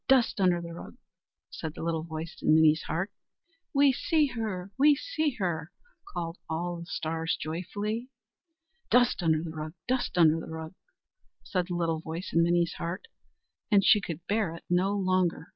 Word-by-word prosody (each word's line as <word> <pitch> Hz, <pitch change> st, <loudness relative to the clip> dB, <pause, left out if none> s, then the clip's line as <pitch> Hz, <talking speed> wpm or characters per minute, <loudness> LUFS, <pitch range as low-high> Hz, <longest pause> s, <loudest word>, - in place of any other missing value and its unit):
dust 255 Hz, -5 st, +4 dB
under 180 Hz, -2 st, +4 dB
the 170 Hz, 0 st, -7 dB
rug!" 170 Hz, -, -9 dB, 0.6 s
said 160 Hz, -2 st, -6 dB
the -, -, -6 dB
little 165 Hz, -1 st, 0 dB
voice 160 Hz, +1 st, -6 dB
in 155 Hz, -, +4 dB
Minnie's 155 Hz, 0 st, +5 dB
heart. 175 Hz, +6 st, -2 dB, 0.6 s
"We 280 Hz, -1 st, +5 dB
see 310 Hz, +3 st, +2 dB
her! 200 Hz, -4 st, -3 dB
we 290 Hz, +2 st, +6 dB
see 310 Hz, -, -1 dB
her!" 170 Hz, -5 st, -2 dB, 0.4 s
called 170 Hz, 0 st, -4 dB
all 175 Hz, +2 st, -2 dB
the 170 Hz, -, -9 dB
stars 165 Hz, -1 st, -2 dB
joyfully. 205 Hz, +9 st, -3 dB, 0.8 s
"Dust 245 Hz, -4 st, +4 dB
under 160 Hz, -2 st, +2 dB
the 165 Hz, -, -5 dB
rug! 155 Hz, 0 st, -6 dB
dust 255 Hz, -6 st, -1 dB
under 165 Hz, -2 st, +5 dB
the -, -, -8 dB
rug!" 160 Hz, +1 st, -6 dB, 0.7 s
said 180 Hz, -3 st, -1 dB
the 175 Hz, -, -3 dB
little 165 Hz, -2 st, 0 dB
voice 165 Hz, +3 st, -6 dB
in 165 Hz, -, +5 dB
Minnie's 170 Hz, 0 st, +2 dB
heart, 170 Hz, -, -4 dB, 0.6 s
and 200 Hz, -3 st, +4 dB
she 210 Hz, -, +6 dB
could 170 Hz, -1 st, -6 dB
bear 205 Hz, -5 st, 0 dB
it 165 Hz, -, -11 dB
no 185 Hz, +3 st, +3 dB
longer. 185 Hz, -3 st, +1 dB
175 Hz, 170 wpm, -29 LUFS, 160-205 Hz, 0.8 s, we